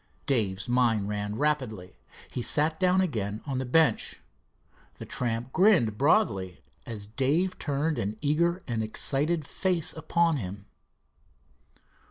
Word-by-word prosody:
Dave's 105 -7 0
mind 120 -4 +2
ran 105 0 -3
rapidly. 125 -9 -2 0.4
He 125 - -3
sat 155 +5 +1
down 185 0 +3
again 110 - -2
on 135 -3 -2
the 130 - -3
bench. 160 +4 +2 0.8
The - - -9
tramp 120 +1 -3
grinned 180 - +4
broadly 100 - +1 0.3
as 105 -3 -6
Dave 140 - 0
turned 150 +2 -1
an 105 +2 -3
eager 170 +5 +1
and 115 -3 -1
excited 145 +8 0
face 180 -2 0
upon 165 0 +1
him. 100 -3 -6
135 Hz, 125 wpm, -27 LUFS, 110-160 Hz, 0.8 s, grinned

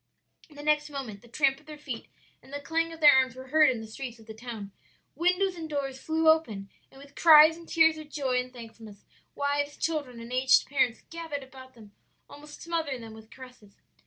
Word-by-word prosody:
"The 290 -1 -11
next 300 0 +1
moment 255 -8 -7
the 240 - -18
tramp 270 +2 +1
of 305 - -25
their 305 -1 -9
feet 265 -6 -7 0.3
and - - -18
the 285 - -4
clang 330 +3 -1
of 325 0 -11
their 295 -1 +9
arms 260 -2 +2
were 260 0 -11
heard 305 0 +5
in 240 -3 -2
the - - -8
streets 240 +2 -7
of 225 - -17
the 220 - -9
town. 220 -3 -8 0.4
Windows 360 +2 +1
and 325 -2 -7
doors 275 -3 -4
flew 320 0 0
open 225 -12 +2 0.2
and 270 - -17
with 280 0 -15
cries 315 -1 +8
and 335 0 -14
tears 320 -1 +4
of 305 -1 -11
joy 265 -4 -1
and 250 0 -5
thankfulness, 225 -4 -13 0.3
wives, 285 0 -1
children, 285 -7 -3
and 230 +2 -9
aged 260 +1 +4
parents 265 -4 0
gathered 325 -4 -5
about 260 -1 -14
them 215 -3 -15 0.4
almost 295 +1 -12
smothering 320 -7 -3
them 225 -1 -10
with 220 0 -14
caresses. 250 -6 -15
275 Hz, 210 wpm, -28 LUFS, 240-310 Hz, 0.4 s, their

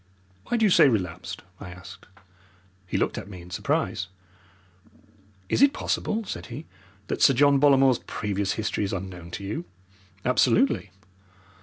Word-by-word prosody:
"Why 240 - +1
do 225 - +3
you 205 - +4
say 150 - +7
relapsed?" 95 -9 -2 0.2
I - - -8
asked. 90 +1 -12 0.8
He - - -1
looked - - 0
at - - -9
me 95 -3 -9
in 90 +1 -13
surprise. 90 +1 -1 1.4
"Is - - +1
it 280 0 +6
possible," 225 -4 -1
said - - -6
he, 135 +6 -8 0.4
"that - - -3
Sir 135 - +6
John 140 +1 +5
Bollamore's 135 -3 +5
previous 100 -2 -2
history 105 -1 -2
is 100 - -2
unknown 90 -2 -6
to 95 +3 -6
you?" 100 -3 -4 0.6
"Absolutely." 125 - +3
105 Hz, 150 wpm, -26 LUFS, 95-140 Hz, 1.4 s, say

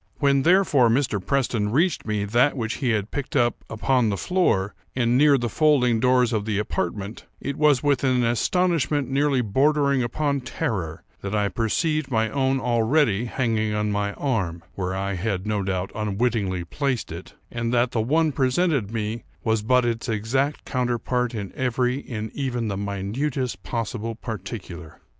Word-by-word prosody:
When, 140 -2 +3
therefore, 165 -7 +4
Mr. 115 -5 +1
Preston 120 -6 0
reached 155 - +1
me 105 -1 -1
that 120 +7 +2
which 115 -2 -2
he 130 - -1
had 105 -2 0
picked 145 +2 -4
up 120 -3 +1
upon 120 +1 +1
the 100 - -1
floor, 115 - +1 0.2
and 120 -1 +2
near 145 +1 +5
the 120 -2 -1
folding 125 -3 +3
doors 125 -1 +3
of 105 -2 -1
the 110 -2 -1
apartment, 100 0 -3
it 140 - -4
was 150 -4 +3
with 140 -2 +2
an 130 -2 +2
astonishment 145 +2 +1
nearly 140 -1 +2
bordering 140 +4 +2
upon 140 +3 -1
terror, 95 -9 -3 0.2
that 100 +2 -3
I 105 -1 +1
perceived 155 - 0
my 110 -3 +1
own 135 +1 +1
already 120 -1 +2
hanging 115 -4 0
on 105 0 0
my 100 0 -1
arm, 95 - -2
(where 95 -1 -3
I 100 +1 -2
had 95 0 -2
no 105 -1 0
doubt 95 -1 -2
unwittingly 105 -3 -1
placed 130 - -2
it,) 85 +3 -9 0.2
and 115 0 -2
that 120 0 +2
the 115 - 0
one 155 +7 +2
presented 130 - +1
me 110 0 -3 0.2
was 110 -2 +1
but 125 +3 +3
its 115 +1 -2
exact 130 +7 -1
counterpart 125 -1 -1
in 100 -3 -5
every, 125 +1 0
in 110 -5 -6
even 125 -5 -2
the 100 - -2
minutest 100 +4 -2
possible 115 +1 -3
particular. 95 -8 -7
120 Hz, 165 wpm, -24 LUFS, 105-135 Hz, 0.2 s, near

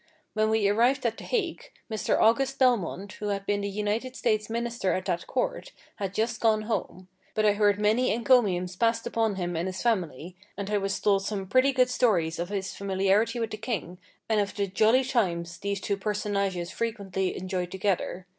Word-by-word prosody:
When 215 0 +2
we 220 -2 +2
arrived 240 +6 +2
at 225 -1 0
the - - -9
Hague, 395 -9 -2 0.2
Mr. 220 -2 0
August 270 +4 +3
Belmont, 205 -6 +1
who 210 - -5
had 200 -1 -2
been 205 0 0
the 200 - -2
United 210 +5 -2
States 215 -4 0
Minister 235 -3 -1
at 185 - -2
that 170 0 -2
court, - - -2 0.2
had 195 -1 -4
just 225 +1 -1
gone 220 -2 +3
home; 185 -4 -3 0.3
but 215 - +2
I 210 - +5
heard 205 -1 +2
many 220 +5 +2
encomiums 210 -7 +2
passed 230 +3 +1
upon 225 -3 0
him 175 -2 -3
and 170 +3 -1
his 185 0 -4
family, 180 - -1 0.2
and 200 0 -4
I 205 - +2
was 195 0 -2
told 200 -2 +2
some 200 -1 -3
pretty 255 +7 +3
good 255 -1 +2
stories 175 -11 +1
of 175 +1 -3
his 195 -2 -3
familiarity 200 +4 +1
with 225 -1 -2
the 215 - -4
king, 210 -6 -4 0.3
and 220 -2 +2
of 200 - -3
the 200 - 0
"jolly 220 +6 +3
times" 170 -10 -1
these 200 -1 -2
two 200 0 -2
personages 200 -3 -2
frequently 200 -5 -2
enjoyed 185 -1 -3
together. 190 -1 -2
205 Hz, 195 wpm, -27 LUFS, 190-230 Hz, 0.3 s, I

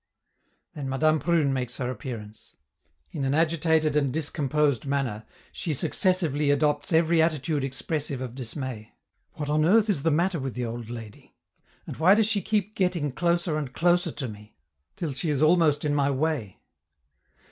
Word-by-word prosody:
Then 140 -3 -5
Madame 155 +4 +2
Prune 160 -5 +2
makes 125 -2 -3
her 125 -2 -2
appearance; 110 -6 -8 0.6
in 140 - -4
an 135 +1 +1
agitated 160 -1 +2
and 140 -3 +2
discomposed 145 -2 0
manner 130 -6 -2 0.3
she 160 -5 -3
successively 150 -2 0
adopts 145 +1 +1
every 165 0 +4
attitude 155 -2 0
expressive 140 +1 -3
of 130 -2 -5
dismay. 125 -3 -6 0.4
What 150 - -5
on 150 +1 +2
earth 210 +5 +4
is 150 - -1
the 165 - +2
matter 170 +3 +1
with 135 -2 -4
the 125 -1 -2
old 115 0 -6
lady, 115 -3 -10 0.5
and - - -7
why 180 +6 +6
does 220 0 +3
she 210 -2 0
keep 210 0 -1
getting 180 -7 0
closer 170 +1 0
and 135 -4 -5
closer 175 +1 +2
to 135 -4 -4
me, 105 -3 -12 0.4
till 160 -5 -3
she 155 +5 -2
is 145 0 +1
almost 155 -3 +3
in 145 - +1
my 140 -1 +2
way? 140 - -2
150 Hz, 165 wpm, -26 LUFS, 130-165 Hz, 0.6 s, why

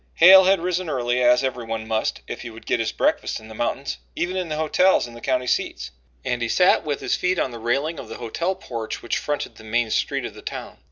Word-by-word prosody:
Hale 190 +2 +9
had 190 -1 +4
risen 180 -1 -1
early, 125 -2 0
as 125 +1 +5
everyone 115 -4 -3
must 110 0 -1
if - - -6
he 120 - -7
would 115 0 -13
get - - +1
his 115 -1 0
breakfast - - 0
in 110 0 -13
the - - -9
mountains, 125 +5 -3 0.2
even 180 +2 -2
in 180 -3 -2
the 155 - -2
hotels 160 +3 +3
in 120 - -12
the 120 - -11
county 130 -1 0
seats, 95 - -2 0.3
and 120 -1 -1
he 115 - -1
sat 180 +5 +4
with 145 -3 -3
his - - 0
feet 180 0 0
on 130 - 0
the 120 - -8
railing 140 +7 -1
of 120 - -9
the 115 - -7
hotel 170 +11 -2
porch 115 - -6
which 120 - -1
fronted 145 -1 -3
the - - -13
main 110 +1 0
street - - 0
of - - -6
the - - -12
town. - - -7
125 Hz, 245 wpm, -23 LUFS, 115-170 Hz, 0.3 s, Hale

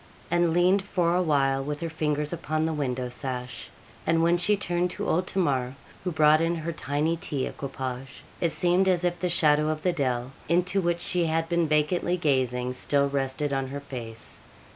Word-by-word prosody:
And 175 -1 +3
leaned 180 +4 +4
for 180 -3 0
a 180 - +3
while 135 -5 +2
with 150 +1 -4
her 165 - -2
fingers 150 -1 -1
upon 155 -1 -1
the 160 - -1
window 130 -4 -2
sash; 125 -1 -4 0.4
and 165 0 +3
when 170 +1 +4
she 205 +4 +2
turned 175 -2 0
to - - -4
old 180 +3 +1
Tamar, 135 -8 0 0.3
who 180 - -1
brought 155 0 +5
in 165 +1 +1
her 165 +1 -3
tiny 150 +2 -1
tea 145 -5 -2
equipage, 130 -1 -6 0.2
it 170 - +1
seemed 180 +3 +2
as 180 -2 +2
if 175 0 0
the 180 +1 0
shadow 150 -2 +3
of 155 0 -3
the 180 - +2
dell, 130 -5 -1 0.2
into 180 +3 +2
which 175 -1 0
she 175 -1 +1
had 165 +1 0
been 170 -1 +1
vacantly 155 +4 +1
gazing, 125 -5 0
still 140 +2 +1
rested 140 +1 -1
on 135 -1 -1
her 140 +2 -5
face. 115 -5 -8
155 Hz, 190 wpm, -26 LUFS, 135-175 Hz, 0.4 s, brought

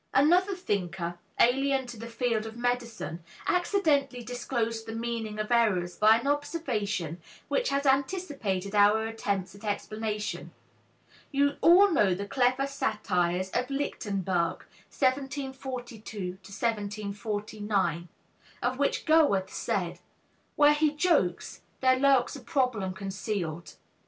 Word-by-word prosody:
Another 355 +8 +4
thinker, 175 - -3 0.2
alien 270 +2 +3
to 240 -1 -8
the 230 +1 -8
field 230 -2 -1
of 225 +1 -9
medicine, 235 -8 -2 0.2
accidentally 300 -9 +1
disclosed 230 -2 -3
the 225 - -5
meaning 225 -2 -3
of 215 +2 -3
errors 195 -7 +2
by 220 +1 +6
an 235 - -6
observation 220 - -2 0.3
which - - +1
has 280 +1 0
anticipated 270 - 0
our 210 +2 +5
attempts 200 -4 -2
at 200 - -15
explanation. 215 0 -3 0.8
You 285 0 +2
all 375 +4 +7
know 205 - +3
the 200 +2 -4
clever 255 +4 +2
satires 190 -9 -1
of 250 - -1
Lichtenberg 195 -11 -1 0.2
(1742 260 -7 -3
1749), 205 -3 -2 0.6
of 255 +2 0
which 285 - 0
Goethe 290 - +4
said, - - -2 0.6
"Where 295 0 +6
he 300 0 +1
jokes, 295 - +1 0.2
there 255 0 +4
lurks 270 -1 +3
a - - -7
problem 250 - 0
concealed." 190 -4 -4
230 Hz, 115 wpm, -28 LUFS, 200-275 Hz, 0.8 s, all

